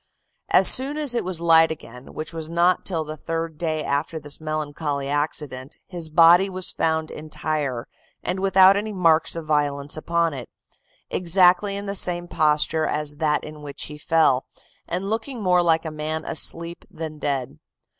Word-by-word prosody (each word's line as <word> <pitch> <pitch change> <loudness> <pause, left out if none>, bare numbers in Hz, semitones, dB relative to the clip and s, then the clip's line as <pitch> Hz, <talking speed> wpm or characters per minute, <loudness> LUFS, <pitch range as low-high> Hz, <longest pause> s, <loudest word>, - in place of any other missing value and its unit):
"As - - +6
soon 275 +3 +3
as 295 -5 +2
it 240 - +1
was 180 -2 -1
light 165 -1 +5
again, 125 -5 -10
which 155 +1 -6
was 160 -1 -6
not 170 +2 +2
till 165 -4 -1
the 155 0 -8
third 165 0 -4
day 155 -2 -2
after 150 +3 -2
this 145 0 -7
melancholy 150 -2 -3
accident, 145 -2 -3
his 170 -4 -6
body 170 +4 +6
was 185 -1 -1
found 160 -1 -1
entire, 150 -5 -4 0.4
and 185 +1 -2
without 190 0 +5
any 210 +1 -3
marks 165 -4 +2
of 165 -1 -6
violence 145 -2 0
upon 170 +1 0
it, 125 -4 -8 0.6
exactly 185 +2 +3
in 200 - -6
the 200 - -3
same 175 -2 +2
posture 155 0 +1
as 150 -1 -1
that 150 -1 0
in 155 0 -10
which 145 -1 -6
he 150 0 -8
fell, 150 -5 +2 0.4
and 180 +3 -3
looking 230 +3 -3
more 180 -1 +3
like 165 -1 +2
a 160 - -4
man 155 +1 -4
asleep 170 +2 -2
than 155 -1 -7
dead. 135 - -3
160 Hz, 170 wpm, -23 LUFS, 150-175 Hz, 0.6 s, As